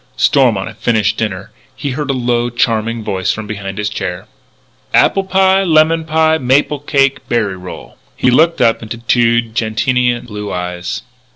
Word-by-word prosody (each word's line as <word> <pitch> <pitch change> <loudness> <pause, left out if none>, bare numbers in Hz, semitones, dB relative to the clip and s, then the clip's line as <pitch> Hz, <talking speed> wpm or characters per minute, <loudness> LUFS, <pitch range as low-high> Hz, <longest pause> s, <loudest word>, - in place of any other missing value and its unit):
Stormont 120 -9 +3
had 110 -1 -11
finished 110 -3 +1
dinner. 95 -3 -3 0.2
He 140 +1 -4
heard 145 +2 -4
a - - +2
low, 120 -1 0
charming 115 -1 -1
voice 95 -3 -1
from 110 - -5
behind 100 -2 -6
his 105 0 -1
chair: 95 -4 -4 0.7
"Apple 195 - +4
pie, 190 0 +3
lemon 160 -1 +3
pie, 160 0 +2
maple 140 +3 +1
cake, 140 -1 0
berry 110 -5 0
roll." 90 -1 -10 0.2
He 125 - +2
looked 165 +6 +3
up 115 - +3
into 115 +1 -6
two 120 0 +2
gentian 120 +2 0
blue 105 -3 -6
eyes. 90 0 -4
120 Hz, 160 wpm, -15 LUFS, 105-140 Hz, 0.7 s, Apple